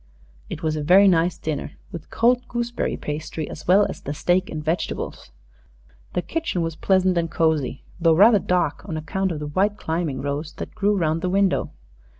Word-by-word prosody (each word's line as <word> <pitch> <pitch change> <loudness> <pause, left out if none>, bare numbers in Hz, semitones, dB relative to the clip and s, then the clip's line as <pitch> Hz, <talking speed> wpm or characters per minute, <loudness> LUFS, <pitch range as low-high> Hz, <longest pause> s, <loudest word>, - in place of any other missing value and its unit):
It 175 -4 -6
was 155 -1 0
a 155 - -2
very 185 +7 +6
nice 175 -1 +3
dinner, 150 -2 -4 0.2
with 170 -2 -8
cold 245 +1 +2
gooseberry 240 0 -2
pastry 155 +1 -5
as 155 - -9
well 195 +3 +6
as - - -7
the 145 - -5
steak 180 +4 +1
and 155 -1 -5
vegetables. 165 - -3 0.8
The 180 - -1
kitchen 320 - -2
was 165 -1 -3
pleasant 185 0 +2
and 165 -1 -2
cozy 155 -5 0 0.2
though 165 -2 +4
rather 210 +4 +6
dark, 180 -1 0
on 160 - -3
account 190 +4 -2
of 160 - -3
the 150 - -5
white 195 +8 0
climbing 160 -7 -2
rose 145 +2 -3
that - - -7
grew 205 -1 +1
round 165 -2 0
the 180 - -1
window. 195 0 +1
170 Hz, 185 wpm, -23 LUFS, 155-195 Hz, 0.8 s, very